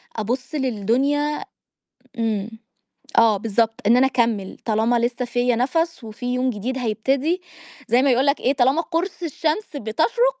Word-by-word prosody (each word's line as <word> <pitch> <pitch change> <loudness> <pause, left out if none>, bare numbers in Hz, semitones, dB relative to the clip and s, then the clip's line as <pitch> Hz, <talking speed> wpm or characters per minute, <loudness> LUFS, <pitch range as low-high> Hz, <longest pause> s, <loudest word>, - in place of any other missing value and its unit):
أبُص 250 +7 -3
للدنيا 275 - 0 0.7
إمم. 220 -2 -1 0.7
آه، 225 -3 +5
بالضبط، 225 +2 +1
إن 235 +2 +6
أنا 265 +1 +5
أكمِّل 230 -6 0
طالما 225 +2 +2
لسه 240 +1 -1
فيَّ 245 0 +1
نفْس 325 +4 0
وفي 245 +3 -4
يوم 255 +1 +1
جديد 245 +4 -3
هيبتدي 265 - 0 0.5
زَي 245 +2 +4
ما 275 -1 +3
يقول 260 +3 +3
لك 280 +1 +2
إيه، 265 - +2
طالما 270 +4 +3
قُرص 345 +2 -3
الشمس 320 +2 -2
بتشرق 470 - +1
250 Hz, 145 wpm, -22 LUFS, 230-290 Hz, 0.7 s, إن